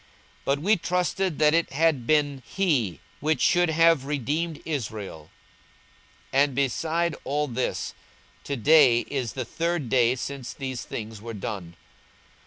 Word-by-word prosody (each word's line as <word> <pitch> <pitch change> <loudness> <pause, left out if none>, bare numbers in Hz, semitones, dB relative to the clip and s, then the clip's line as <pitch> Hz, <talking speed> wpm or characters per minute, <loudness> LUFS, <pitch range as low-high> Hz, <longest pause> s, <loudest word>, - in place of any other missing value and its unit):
42:024:021 - - -29 0.4
But 140 +1 +1
we 205 +6 +4
trusted 180 0 -1
that 150 0 +4
it 170 0 +2
had 150 -5 +2
been 145 -3 +2
he 120 - 0 0.2
which 155 +2 +1
should 175 -1 +3
have 165 -3 +4
redeemed 150 +4 -2
Israel: 105 - -5 1.0
and 140 0 +3
beside 160 +5 0
all 150 +2 -1
this, 125 0 -2 0.5
to 140 - -2
day 130 -2 +6
is 130 -6 -3
the 130 -2 -4
third 165 0 -2
day 125 -1 +3
since 130 -1 -6
these 130 -3 -4
things 110 -2 -6
were 115 0 -7
done. 95 -4 -6
140 Hz, 140 wpm, -26 LUFS, 120-160 Hz, 1.0 s, day